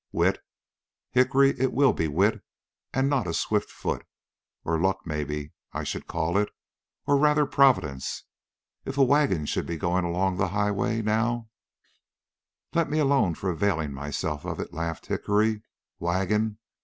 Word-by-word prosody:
"Wit? - - +2 0.7
Hickory, 135 +2 +4
it 130 0 +1
will 140 0 +4
be 80 - 0
wit 100 +8 +1 0.5
and 135 +1 +1
not 135 -8 +1
a 85 - -2
swift - - 0
foot. - - -3 0.6
Or 80 0 0
luck, 95 +1 0
maybe 75 -2 -4 0.2
I - - -3
should - - -4
call 85 +3 0
it, 105 - 0 0.6
or 145 - +4
rather 150 +1 +4
providence. 125 - +2 0.6
If 135 - -5
a 140 - +6
wagon 135 - +3
should - - -2
be 85 - -3
going 90 +3 0
along 90 +2 0
the 95 -1 +1
highway, 105 +3 0
now 110 +2 0 0.6
" - - -55
"Let 170 -3 +1
me 150 - 0
alone 135 - +3
for 95 +2 -2
availing 80 -4 0
myself 70 +2 -3
of - - -4
it," - - -5
laughed 80 0 -4
Hickory. 105 +1 +1 0.4
"Wagon! 95 +5 0
100 Hz, 155 wpm, -26 LUFS, 85-130 Hz, 0.7 s, a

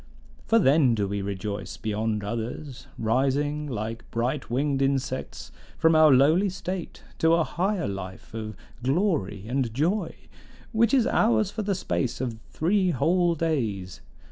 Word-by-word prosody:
For 230 - +4
then 140 - +4
do 100 -2 0
we 100 +1 -2
rejoice 100 +1 -4
beyond 110 0 -2
others, 120 +5 -5
rising 140 +6 0
like 115 -2 -5
bright 125 +5 -2
winged 135 +3 0
insects 135 -1 -2 0.3
from 160 0 +4
our 155 -1 +7
lowly 155 +10 +5
state 185 -1 -6 0.2
to 165 +1 +4
a 170 - +3
higher 185 - -1
life 95 0 -7
of 110 -2 -5 0.3
glory 130 - 0
and 125 -1 -1
joy, 175 - 0 0.6
which 230 +2 +3
is 250 -4 +4
ours 215 -5 +2
for 220 - -3
the 200 -1 0
space 130 -8 -2
of 120 -3 -3
three 185 +3 +1
whole 170 +4 +2
days. 115 - -2
135 Hz, 145 wpm, -26 LUFS, 110-170 Hz, 0.6 s, our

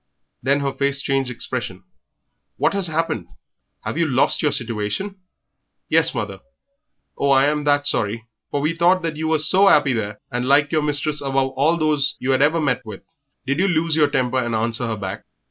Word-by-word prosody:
Then 140 +3 +1
her 140 -1 -2
face 140 0 0
changed 135 -2 -1
expression. 125 - -5 0.7
"What - - +1
has 200 -2 0
happened? 160 - -2 0.5
Have 160 - -4
you 165 - +2
lost 130 -2 +2
your 150 - +2
situation?" 120 - -3 0.7
"Yes, - - +3
mother." - - -4 0.8
"Oh, 140 - 0
I 135 0 +5
am 150 0 0
that 145 0 +2
sorry, 110 -4 0 0.2
for 145 - -2
we 155 +3 0
thought 170 -1 +1
you 160 +1 -3
was 155 -1 +3
so 195 +1 +5
'appy 145 -6 +4
there 105 -3 -3
and 125 0 -2
liked 145 +2 +3
your 155 -2 +2
mistress 150 0 0
above 135 -1 0
all 145 +6 +1
those 150 -2 +1
you 135 +1 0
'ad 130 - +1
ever 155 +3 +3
met 135 -5 0
with. 110 -4 -10 0.4
Did 140 +4 -1
you 195 - +3
lose 165 -3 +1
your 150 -2 +3
temper 130 -3 0
and 120 -2 -2
answer 115 +2 -1
her 110 -1 -3
back? 95 -1 -6
140 Hz, 190 wpm, -21 LUFS, 125-155 Hz, 0.8 s, I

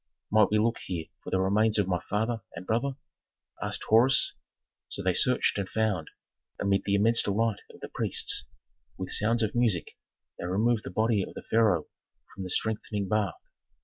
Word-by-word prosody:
"Might 110 +1 +5
we 105 - +2
look 115 +2 +1
here 85 -4 -4 0.2
for - - -7
the 95 - +1
remains 105 +3 +2
of 100 -3 +2
my 90 -2 0
father 110 +2 0
and 85 +2 -7
brother?" 125 +6 0 0.7
asked - - -3
Horus. 120 +5 +4 0.6
So - - -4
they 95 0 +2
searched 125 0 +2
and 95 -1 -3
found; 105 -7 -1 0.5
amid 100 0 +1
the 100 - +2
immense 115 +3 +4
delight 105 +1 0
of - - -15
the - - -5
priests, - - 0 0.5
with 95 - -5
sounds 115 +2 +3
of 110 - -1
music, 115 -9 0 0.4
they - - -4
removed 110 +5 +1
the - - -4
body 110 +2 +1
of - - -6
the - - -7
pharaoh 110 -8 +2 0.5
from 95 - -8
the 95 - -5
strengthening 105 0 -2
bath. 105 -5 0
105 Hz, 180 wpm, -28 LUFS, 95-115 Hz, 0.7 s, Might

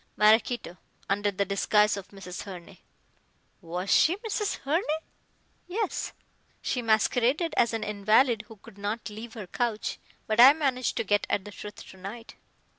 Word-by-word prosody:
"Maraquito, 215 -2 +3 0.3
under 205 +1 +1
the 200 0 -1
disguise 210 +2 +3
of 200 -1 -7
Mrs. 190 -3 -8
Herne." 185 -1 -10 0.8
"Was 180 +2 -4
she 335 - +5
Mrs. 420 -1 -2
Herne?" 305 +6 +1 0.9
"Yes. 405 +3 -2 0.5
She 250 - -2
masqueraded 245 - +2
as 235 - +3
an 225 -1 -2
invalid 215 +3 +2
who 225 - -12
could 205 0 -16
not 210 +2 -3
leave 220 +2 -8
her 215 -4 -6
couch, 220 +3 -2 0.3
but 215 +1 -1
I 260 +4 +11
managed 270 -5 -1
to - - +1
get 205 0 +1
at 195 - 0
the 205 - -8
truth 205 0 -9
to 190 - -13
night." 210 +5 -8
215 Hz, 155 wpm, -28 LUFS, 200-245 Hz, 0.9 s, I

